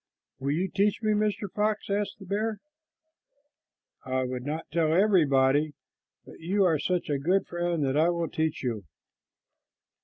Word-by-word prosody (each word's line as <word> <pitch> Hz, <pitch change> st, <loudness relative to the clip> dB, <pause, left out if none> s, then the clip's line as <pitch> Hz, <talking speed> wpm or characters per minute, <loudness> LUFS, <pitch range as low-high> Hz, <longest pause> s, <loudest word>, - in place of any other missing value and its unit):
"Will 135 Hz, +1 st, -2 dB
you 180 Hz, +5 st, 0 dB
teach 200 Hz, +3 st, 0 dB
me, 215 Hz, -, +2 dB
Mr. 210 Hz, -1 st, 0 dB
Fox?" 210 Hz, -1 st, 0 dB
asked 205 Hz, 0 st, -1 dB
the 195 Hz, -, -12 dB
bear. 210 Hz, +3 st, -1 dB, 1.5 s
"I 130 Hz, 0 st, -1 dB
would 125 Hz, -1 st, -4 dB
not 155 Hz, +4 st, -4 dB
tell 160 Hz, -1 st, +2 dB
everybody, 150 Hz, -6 st, +3 dB, 0.5 s
but -, -, -13 dB
you 195 Hz, +5 st, +1 dB
are 160 Hz, -4 st, +2 dB
such 180 Hz, +4 st, -1 dB
a 145 Hz, -3 st, 0 dB
good 180 Hz, +7 st, +1 dB
friend 175 Hz, -3 st, -1 dB
that 135 Hz, 0 st, 0 dB
I 160 Hz, +3 st, +4 dB
will 170 Hz, -1 st, -1 dB
teach 160 Hz, -2 st, -2 dB
you. 115 Hz, -5 st, -2 dB
170 Hz, 155 wpm, -27 LUFS, 145-200 Hz, 1.5 s, I